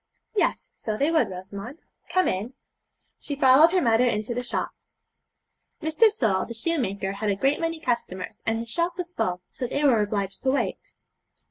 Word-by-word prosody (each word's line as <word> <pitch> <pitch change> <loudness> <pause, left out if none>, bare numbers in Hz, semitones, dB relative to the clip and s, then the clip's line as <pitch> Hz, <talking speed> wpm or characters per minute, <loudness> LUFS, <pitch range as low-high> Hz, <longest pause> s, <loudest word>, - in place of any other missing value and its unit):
'Yes, - - 0
so 215 -1 -4
they 290 +6 +2
would, 320 -2 +3
Rosamond. 195 - -8 0.3
Come 370 -1 +2
in.' 210 +8 -2 0.6
She 285 - -5
followed 275 +4 +6
her 370 -1 +2
mother 235 +1 +4
into 215 0 -1
the 245 - -2
shop. 245 - -2 1.1
Mr. 315 +9 +4
Sole, 220 - +1
the 235 - -7
shoemaker, 225 - -1
had 205 +2 -2
a 200 - +2
great 270 +8 +1
many 330 -1 -2
customers, 235 - -3
and 225 0 0
his 230 0 -5
shop 345 +3 -1
was 355 -1 -5
full, 180 - -1
so 250 - -4
they 285 +4 -2
were 250 -7 +5
obliged 200 -2 -2
to 265 - +1
wait. 275 - -2
245 Hz, 175 wpm, -25 LUFS, 205-310 Hz, 1.1 s, followed